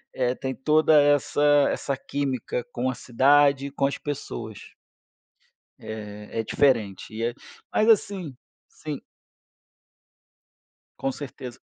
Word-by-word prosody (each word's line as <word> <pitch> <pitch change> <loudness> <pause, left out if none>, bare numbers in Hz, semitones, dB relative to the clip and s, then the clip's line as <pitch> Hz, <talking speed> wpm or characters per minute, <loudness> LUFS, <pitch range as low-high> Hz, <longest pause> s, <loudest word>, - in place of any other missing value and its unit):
é, 125 -1 0
tem 130 0 -4
toda 155 +2 +4
essa 145 0 +2 0.3
essa 140 - -2
química 135 -3 -3
com 130 -1 -1
a 130 - -1
cidade 140 +3 +3
e - - -9
com 140 - 0
as 140 - -3
pessoas. 120 -7 -7 1.1
É 105 0 -7
é 115 - 0
diferente. 115 -2 0 0.4
Mas 215 - +2
assim 190 - +1 0.3
sim. 150 -3 -7 2.0
Com 135 - -1
certeza. 130 -3 -8
135 Hz, 105 wpm, -25 LUFS, 120-145 Hz, 2.0 s, toda